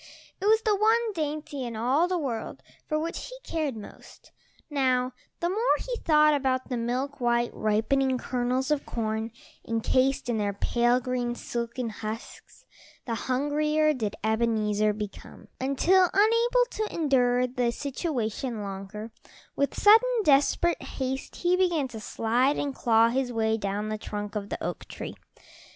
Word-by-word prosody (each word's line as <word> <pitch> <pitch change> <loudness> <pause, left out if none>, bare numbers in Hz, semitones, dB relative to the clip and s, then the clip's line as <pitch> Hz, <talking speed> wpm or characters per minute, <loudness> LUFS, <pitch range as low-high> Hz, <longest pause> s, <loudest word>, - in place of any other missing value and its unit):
It - - -2
was 440 +1 +4
the 425 -1 +3
one 445 +2 +2
dainty 300 -4 -3
in 235 -2 -5
all 260 +10 +2
the 365 0 0
world 245 -8 -4 0.2
for 305 - 0
which 330 +3 -3
he - - -9
cared 300 -7 -2
most. 210 - -13 0.4
Now 255 -3 +1 0.3
the 340 - +1
more 445 +6 +2
he - - -4
thought 305 -4 +4
about 260 -2 0
the 250 - -1
milk 250 +4 -2
white, 240 0 +2
ripening 255 +5 +1
kernels 255 +2 -1
of 295 -2 +1
corn, 220 0 -3 0.3
encased 255 +4 +1
in 235 -3 0
their 205 -1 0
pale 240 +4 +2
green, 245 -1 -2
silken 235 0 -4
husks, 215 +2 -8 0.4
the 235 - -2
hungrier 300 +5 +1
did 215 -6 -3
Ebenezer 215 -1 +1
become, 210 -1 -8
until, 345 +8 +3
unable 465 +4 +4
to 435 0 -2
endure 250 -5 +2
the 245 -1 0
situation 250 - -3
longer, 200 +3 -7 0.4
with 280 - -1
sudden, 450 +2 +5
desperate 300 +3 +3
haste 265 0 -4
he 355 0 +2
began 350 -7 +1
to 225 -2 -8
slide 240 +6 +1
and 285 -1 -2
claw 230 -2 +4
his 255 +1 -1
way 220 -1 +1
down 205 0 -3
the 215 0 -3
trunk 210 -1 -5
of 205 -2 -4
the - - -5
oak - - -4
tree. - - -7
255 Hz, 150 wpm, -27 LUFS, 225-305 Hz, 0.4 s, sudden